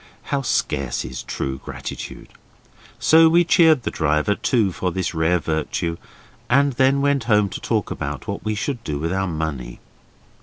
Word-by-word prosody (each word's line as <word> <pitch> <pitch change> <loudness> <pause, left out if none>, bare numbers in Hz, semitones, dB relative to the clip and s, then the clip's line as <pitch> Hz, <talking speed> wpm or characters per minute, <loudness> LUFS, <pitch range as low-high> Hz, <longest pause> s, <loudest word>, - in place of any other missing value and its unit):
How 140 - +1
scarce 70 - -1
is 65 0 -6
true 65 0 -4
gratitude! - - -8 0.7
So 160 0 +6
we 170 +2 +5
cheered 160 -6 +4
the - - -2
driver 75 +4 +1
too 105 -2 +1
for 90 +1 -2
this 90 0 -2
rare 80 +2 +2
virtue, 80 +1 -2 0.5
and 140 +2 +3
then 135 +3 +3
went 140 -3 +1
home 105 -3 +3
to - - -7
talk - - -1
about 70 -2 -5
what - - -4
we 110 0 -1
should 120 +2 -3
do 75 -2 -3
with 80 +4 -2
our 95 0 0
money. 80 -7 -4
95 Hz, 165 wpm, -22 LUFS, -, 0.7 s, So